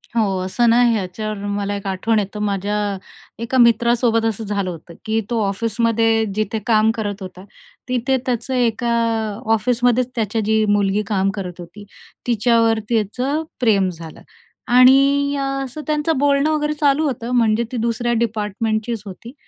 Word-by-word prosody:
हो. 230 - +3 0.2
असं 235 +5 +1
ना, 240 +2 +4
ह्याच्यावर 215 0 -3 0.2
मला 205 0 -2
एक 200 0 -6
आठवण 210 +4 0
येतो, 205 +1 -4
माझ्या 205 0 -1 0.7
एका 255 +2 -1
मित्रासोबत 235 -1 +3
असं 225 0 -2
झालं 200 -2 -2
होतं, 170 0 -9
की 220 +1 0
तो 235 -2 0
ऑफिसमध्ये 225 +2 +1
जिथे 215 +1 -1
काम 220 -1 +4
करत 205 -2 -4
होता 185 0 -9 0.5
तिथे 255 +1 +1
त्याचं 250 +1 -2
एका 240 -1 0 0.6
ऑफिसमध्येच 245 +2 +1
त्याची 225 -1 -1
जी 220 0 +2
मुलगी 205 0 +1
काम 195 -2 +1
करत 180 -3 -6
होती. 175 +4 -11 0.4
तिच्यावर 230 -1 +2
त्याचं 250 +7 -1 0.2
प्रेम 200 -6 +2
झालं 165 -2 -10 0.6
आणि 275 +2 +5
अ, 275 - -1 0.2
असं 270 +4 -7
त्यांचं 305 +1 0
बोलणं 280 +2 +2
वगैरे 300 -1 0
चालू 290 +1 +2
होतं, 245 -3 -3
म्हणजे 225 -1 +2
ती 250 - -3
दुसऱ्या 235 +1 -1
डिपार्टमेंटचीच 220 0 -2
होती 215 +6 -10
225 Hz, 150 wpm, -20 LUFS, 205-245 Hz, 0.7 s, आणि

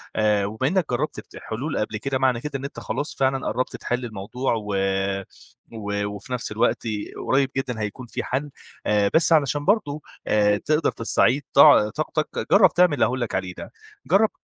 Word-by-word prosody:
آآ، 105 -2 +2
وبما 110 +6 -2
إنك 185 0 +1
جرّبت 120 - -2 0.2
حلول 135 +8 -4
قبل 110 0 -2
كده، 135 +5 -2
معنى 130 -3 +2
كده 150 - -5
إن 135 - -6
أنت 140 - -7
خلاص 145 - -4
فعلًا 135 0 0
قرّبت 130 +1 -2
تحِل 125 +1 -2
الموضوع، 115 +4 -3
و 105 -2 -3 1.0
و 100 -2 -3
وفي 105 +5 -7
نفْس 125 -3 -3
الوقت 115 +3 +1 0.4
قريب 135 0 +3
جدًا 125 -4 -2
هيكُون 105 +5 -5
في - - -4
حَل 140 +3 -3 0.3
آآ، 105 -1 +2
بس 165 +1 +4
علشان 145 -1 +2
برضه 160 -8 +1 0.6
تقدَر 155 +1 +2
تستعيد 120 +4 +1
طع 140 -7 +7
طاقتك 155 +5 -2 0.2
جرّب 200 0 +6
تعمل 180 -3 +4
اللي 140 - +3
هأقول 130 +1 -2
لك 120 - -2
عليه 95 -1 -2
ده، - - -8 0.4
جرّب، 210 +3 +4
130 Hz, 175 wpm, -23 LUFS, 110-145 Hz, 1.0 s, طع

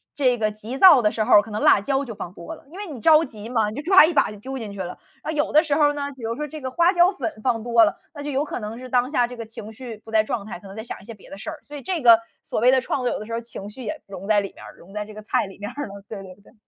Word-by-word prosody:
这 255 -4 +2
个 215 -2 0
急 215 +5 -7
躁 330 -5 +8
的 210 - +3
时 215 - -1
候 210 -3 +7
可 220 - -11
能 210 - -3
辣 - - +6
椒 270 +7 0
就 230 -4 -7
放 175 - -7
多 170 -3 -8
了。 - - -19
因 345 - -12
为 410 0 -6
你 290 -7 -7
着 310 +6 +6
急 220 -6 -9
嘛， 225 -4 +1
你 215 - -8
就 - - -2
抓 375 -1 +8
一 340 - -1
把 - - +3
就 210 - -10
丢 265 +4 -6
进 220 -5 -6
去 200 - -10
了。 180 -1 -5 0.3
呃， - - -3
有 295 -2 -1
的 305 - +6
时 300 -4 -1
候 295 -1 +4
呢， 285 -1 -4
比 245 - -11
如 225 +1 -2
说 300 - -3
这 310 +2 -8
个 260 -2 -4
花 340 +5 +4
椒 350 0 +5
粉 235 - -3
放 230 -4 0
多 235 -1 +5
了， 205 - -1 0.2
那 290 - -8
就 295 - -4
有 275 +1 +1
可 - - -5
能 215 0 -6
是 255 0 -9
当 250 0 +2
下 250 -5 +3
这 245 0 -10
个 230 - -6
情 220 -1 -9
绪 230 0 -8
不 220 - -12
在 220 -1 +5
状 220 -3 -3
态， 205 - -7
可 195 - -13
能 195 - -10
在 220 - -6
想 235 - -7
一 - - -16
些 230 - -8
别 205 - -17
的 195 - -9
事 210 - -6
儿。 315 - -7
所 295 0 -9
以 - - -8
这 360 +1 -2
个， 230 -3 +8 0.2
所 - - -3
谓 245 +3 +5
的 260 0 +4
创 260 +1 -2
作 245 - +2
有 - - -4
的 215 - -7
时 230 - -10
候 230 - -1
情 210 -3 -9
绪 255 +5 -10
也 210 - -5
融 195 0 -8
在 210 -1 +4
里 195 - -6
面 - - -13
儿 - - -12
融 190 +3 -16
在 210 0 -3
这 215 - -12
个 215 - -9
菜 215 - 0
里 195 - -12
面 205 +2 -5
儿 285 +2 -5
了， 200 0 -11
对 210 -3 -6
对 185 -1 -11
对。 - - -21
235 Hz, 385 characters per minute, -23 LUFS, 210-280 Hz, 0.3 s, 躁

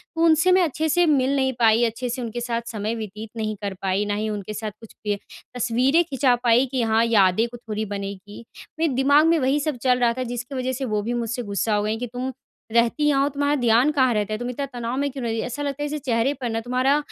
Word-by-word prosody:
तो 325 - -1
उनसे 330 +3 +4
मैं 370 0 +5
अच्छे 315 0 -1
से 350 +3 +3
मिल 275 -3 +2
नहीं 265 -1 +1
पाई, 225 0 +4
अच्छे 235 +2 -3
से 245 +2 -3
उनके 240 0 -4
साथ 235 -1 -2
समय 215 0 -3
व्यतीत 215 0 -7
नहीं 215 -1 -2
कर 200 -1 -2
पाई, 195 +2 0
ना 205 - -1
ही 215 +1 -2
उनके 210 0 -5
साथ 215 0 -4
कुछ 225 - -13
पय 205 -1 0 0.4
तस्वीरें 250 +7 +2
खिंचा 270 -5 +2
पाई 240 +2 +4
कि 260 -2 0
हाँ, 225 0 +3
यादें 220 -1 +3
को 240 - -10
थोड़ी 220 -2 -4
बनेंगी। 200 +1 -7 0.3
मेरे 325 -4 +1
दिमाग़ 285 +4 +4
में 335 0 +4
वही 270 +2 +2
सब 295 -2 -2
चल 250 -1 +3
रहा 240 -1 +3
था 255 - -1
जिसकी 245 +2 -5
वज़ह 255 0 -1
से 265 +1 -3
वो 215 -3 -1
भी 230 +4 -3
मुझसे 240 0 -2
गुस्सा 205 +1 -1
हो 205 - +1
गई 215 +1 -1
कि 245 +2 -4
तुम 255 +1 -3 0.4
रहती 235 +5 +2
यहाँ 275 -2 +3
हो, 285 - +1
तुम्हारा 285 +1 0
ध्यान 240 +5 +4
कहाँ 260 -4 +3
रहता 210 0 -1
है? - - -1
तुम 245 0 -3
इतना 275 +3 -3
तनाव 240 +1 -3
में 285 +1 0
क्यों 265 -1 -6
रहती, 225 -1 -1
ऐसा 250 +4 -5
लगता 285 0 -3
है - - -1
जैसे 300 +1 -3
चेहरे 240 +2 +1
पर 245 - -2
ना 225 0 -1
तुम्हारा 255 +4 +2
240 Hz, 255 wpm, -23 LUFS, 220-270 Hz, 0.4 s, मैं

